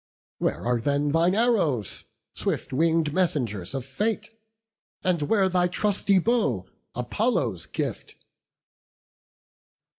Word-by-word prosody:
Where - - -1
are 120 -1 +1
then 145 +3 +1
Thine 165 +5 +3
arrows, 195 - +1 0.3
swift - - -3
wing'd 160 +1 +2
messengers 130 - -1
of 130 -2 -3
fate, 210 - -2 0.7
And 180 -3 +1
where 195 +6 +3
thy 180 -1 +2
trusty 200 +1 +1
bow, 180 - +1 0.3
Apollo's 205 - -1
gift?" - - -4
165 Hz, 100 wpm, -26 LUFS, 130-195 Hz, 0.7 s, Thine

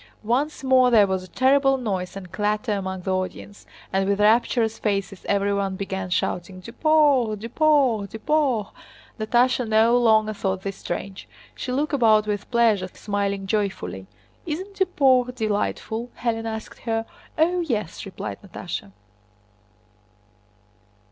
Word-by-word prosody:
Once 270 +7 -1
more 260 -1 +5
there 220 -4 +6
was 190 -1 -1
a - - -11
terrible 270 +4 +3
noise 195 -7 -3
and 185 -3 -10
clatter 210 +2 -1
among 190 -2 -3
the 190 +1 -1
audience, 185 +2 -5 0.3
and 195 0 +1
with 200 0 +1
rapturous 225 +1 +2
faces 195 -2 -2
everyone 200 -1 0
began 190 -1 -4
shouting: 180 +1 -2
"Duport! 265 - +2
Duport! 245 -2 +2
Duport!" 245 -1 0 0.5
Natásha 245 +2 +2
no 220 +2 +4
longer 220 -3 +3
thought 190 -2 -2
this 195 -1 -4
strange. 195 -1 -6 0.3
She 255 - -5
looked 290 +4 -1
about 220 -5 +4
with 205 -1 -3
pleasure, 225 -6 +2
smiling 200 0 -3
joyfully. 185 - -2 0.4
"Isn't 375 +6 -5
Duport 260 -9 +3
delightful?" 220 +1 -2
Hélène 225 -2 -1
asked 220 -1 -6
her. 225 -1 -2 0.3
"Oh, 345 +3 +2
yes," 220 - -3
replied 195 - -6
Natásha. 175 - -7
215 Hz, 130 wpm, -23 LUFS, 195-250 Hz, 0.5 s, there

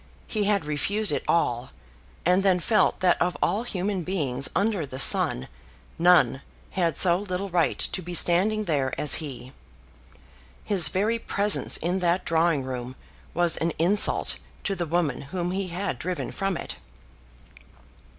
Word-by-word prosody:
He 210 -2 -2
had 200 -5 0
refused 200 +9 0
it - - -2
all, 125 -7 0 0.6
and 180 +2 +3
then 190 -2 +2
felt 220 +4 +1
that 180 -2 +2
of 180 0 0
all 210 - 0
human 195 -4 -3
beings 140 -8 -2
under 200 -2 0
the 130 -2 -8
sun 65 - +4 0.5
none 165 -7 +4 0.3
had 170 -5 -1
so 175 -1 +5
little 195 0 -4
right 175 -2 0
to 185 - -3
be 175 0 -7
standing 195 +6 +2
there 140 -8 -2
as 150 - +3
he. 125 -1 -10 1.1
His 185 -6 +5
very 210 +8 -1
presence 205 -2 +2
in 180 +3 -2
that 175 0 0
drawing 165 -3 +1
room 130 -1 -6 0.4
was 175 -1 +1
an 165 0 -2
insult 185 +6 +3 0.2
to 200 - -2
the 175 -3 -4
woman 160 -4 -1
whom 175 0 -3
he 190 0 -3
had 185 +3 -4
driven 180 0 -4
from 195 -3 -3
it. - - -7
175 Hz, 150 wpm, -25 LUFS, 155-195 Hz, 1.1 s, so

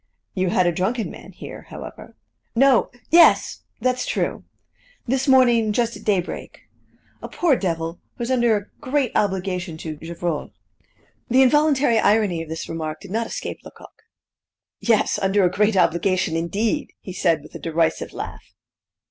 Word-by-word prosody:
"You 185 -1 0
had 180 0 +2
a 175 - +3
drunken 205 +7 -1
man - - -12
here, - - -10
however." - - -10 0.4
"No 265 0 +4 0.2
yes 335 +1 +5 0.2
that's 255 0 0
true - - -2 0.6
this 265 +2 0
morning 240 -5 +5
just 235 0 0
at 210 - -11
daybreak. 190 -4 -2 0.6
A - - -7
poor 335 -6 +2
devil, 165 -4 -3 0.2
who - - -4
is 240 - -2
under 240 -4 +3
a 205 - -6 0.2
great 265 -2 0
obligation 185 -4 -1
to 160 -1 -6
Gevrol." 170 -1 -4 0.8
The 260 +2 +5
involuntary 280 -3 +3
irony 205 -6 +2
of 165 - -8
this 160 +1 -5
remark 155 -1 -5
did 200 - -11
not 225 +2 -1
escape - - -5
Lecoq. - - -15 0.8
"Yes, 225 -3 +2
under 195 +1 +2
a 175 - +2
great 210 +1 +2
obligation, 180 0 +2
indeed!" 210 - -1
he 185 - -8
said 165 -5 +1
with - - -15
a - - -7
derisive 165 0 -1
laugh. - - -7
205 Hz, 155 wpm, -22 LUFS, 170-240 Hz, 0.8 s, yes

